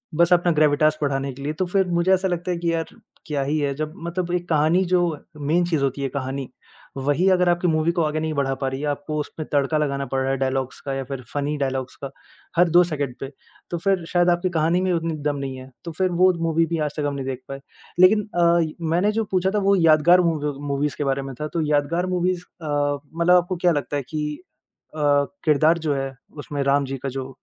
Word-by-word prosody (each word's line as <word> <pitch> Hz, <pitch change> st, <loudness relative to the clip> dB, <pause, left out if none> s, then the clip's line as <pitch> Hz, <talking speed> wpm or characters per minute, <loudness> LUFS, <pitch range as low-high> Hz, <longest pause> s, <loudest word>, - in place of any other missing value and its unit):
बस 170 Hz, +2 st, +4 dB
अपना 175 Hz, 0 st, +3 dB
ग्रेविटास 155 Hz, 0 st, +3 dB
बढ़ाने 140 Hz, -1 st, -1 dB
के 135 Hz, -, -11 dB
लिए 150 Hz, -, -2 dB
तो 185 Hz, +4 st, -1 dB
फिर 190 Hz, +1 st, +1 dB
मुझे 175 Hz, +2 st, +2 dB
ऐसा 190 Hz, 0 st, +2 dB
लगता 175 Hz, 0 st, -2 dB
है 175 Hz, -, -1 dB
कि 170 Hz, 0 st, -1 dB
यार, 165 Hz, -1 st, -1 dB, 0.4 s
क्या 145 Hz, -3 st, -1 dB
ही 145 Hz, +3 st, -1 dB
है 140 Hz, -1 st, 0 dB
जब 155 Hz, +2 st, -4 dB
मतलब 175 Hz, 0 st, -3 dB
एक 175 Hz, 0 st, -3 dB
कहानी 160 Hz, +4 st, +3 dB
जो 180 Hz, 0 st, +2 dB, 0.4 s
मेन 155 Hz, +5 st, +1 dB
चीज़ 160 Hz, -5 st, 0 dB
होती 135 Hz, +1 st, -1 dB
है 135 Hz, -, -1 dB
कहानी, 135 Hz, 0 st, -4 dB, 0.5 s
वही 145 Hz, +7 st, +1 dB
अगर 180 Hz, -1 st, +3 dB
आपकी 175 Hz, +1 st, +1 dB
मूवी 155 Hz, 0 st, +2 dB
को 170 Hz, -, +1 dB
आगे 155 Hz, 0 st, -1 dB
नहीं 160 Hz, 0 st, -2 dB
बढ़ा 140 Hz, -2 st, 0 dB
पा 135 Hz, -, 0 dB
रही 135 Hz, 0 st, -5 dB
है 150 Hz, -, -2 dB
आपको 145 Hz, +2 st, -3 dB
उसमें 150 Hz, +1 st, -6 dB
तड़का 145 Hz, +2 st, +2 dB
लगाना 140 Hz, -2 st, -1 dB
पड़ 135 Hz, +1 st, -1 dB
रहा 135 Hz, 0 st, 0 dB
है 135 Hz, -, 0 dB
डायलॉग्स 130 Hz, 0 st, -2 dB
का 135 Hz, -, -4 dB
या 135 Hz, -, -2 dB
फिर 135 Hz, 0 st, -6 dB
फ़नी 145 Hz, +1 st, -1 dB
डायलॉग्स 130 Hz, -2 st, -3 dB
का 140 Hz, -, -3 dB, 0.5 s
हर 175 Hz, 0 st, +5 dB
2 175 Hz, +2 st, +6 dB
सेकंड 145 Hz, -6 st, -3 dB
पे, 135 Hz, +1 st, -6 dB, 0.4 s
तो 175 Hz, -, -1 dB
फिर 190 Hz, 0 st, 0 dB
शायद 175 Hz, 0 st, +3 dB
आपकी 175 Hz, +1 st, +1 dB
कहानी 170 Hz, +2 st, +1 dB
में 185 Hz, -, +1 dB
ही 175 Hz, -, +2 dB
उतनी 165 Hz, -1 st, -2 dB
दम 145 Hz, -1 st, 0 dB
नहीं 135 Hz, -1 st, -4 dB
है। 130 Hz, 0 st, -10 dB, 0.2 s
तो 170 Hz, -, -4 dB
फिर 185 Hz, +3 st, 0 dB
वो 185 Hz, 0 st, +7 dB
मूवी 165 Hz, 0 st, +2 dB
भी 165 Hz, +1 st, -2 dB
आज 145 Hz, -, -8 dB
तक 150 Hz, -, -1 dB
हम 145 Hz, -, -2 dB
नहीं 135 Hz, -1 st, -4 dB
देख 130 Hz, -1 st, -4 dB
पाए। 135 Hz, 0 st, -6 dB, 0.4 s
लेकिन 205 Hz, +4 st, +6 dB, 0.2 s
अ, 170 Hz, 0 st, +4 dB, 0.3 s
मैंने 180 Hz, +5 st, +2 dB
जो 225 Hz, +1 st, 0 dB
पूछा 185 Hz, 0 st, +2 dB
था -, -, +3 dB
वो 200 Hz, -, +5 dB
यादगार 165 Hz, +1 st, +5 dB
मूवी 155 Hz, -4 st, 0 dB, 0.2 s
मूवीज़ 140 Hz, 0 st, -1 dB
के -, -, -1 dB
बारे 135 Hz, 0 st, 0 dB
में 135 Hz, 0 st, -6 dB
था 150 Hz, -, -1 dB
तो 170 Hz, -, 0 dB
यादगार 150 Hz, +5 st, +1 dB
मूवीज़ 180 Hz, 0 st, 0 dB, 0.2 s
अ, 145 Hz, -1 st, 0 dB, 0.2 s
मतलब 170 Hz, +2 st, +4 dB
आपको 180 Hz, +1 st, +2 dB
क्या 175 Hz, +1 st, +3 dB
लगता 145 Hz, -1 st, -2 dB
है 140 Hz, -, -3 dB
कि 150 Hz, -1 st, -3 dB, 0.6 s
अ, -, -, -6 dB, 0.5 s
किरदार 155 Hz, +2 st, +4 dB
जो 155 Hz, -3 st, 0 dB
है 135 Hz, -1 st, -3 dB, 0.2 s
उसमें 145 Hz, -1 st, -4 dB
राम 140 Hz, +1 st, +2 dB
जी 135 Hz, 0 st, -4 dB
का 135 Hz, -, -1 dB
जो, 135 Hz, 0 st, -5 dB
155 Hz, 245 wpm, -23 LUFS, 140-175 Hz, 0.6 s, वो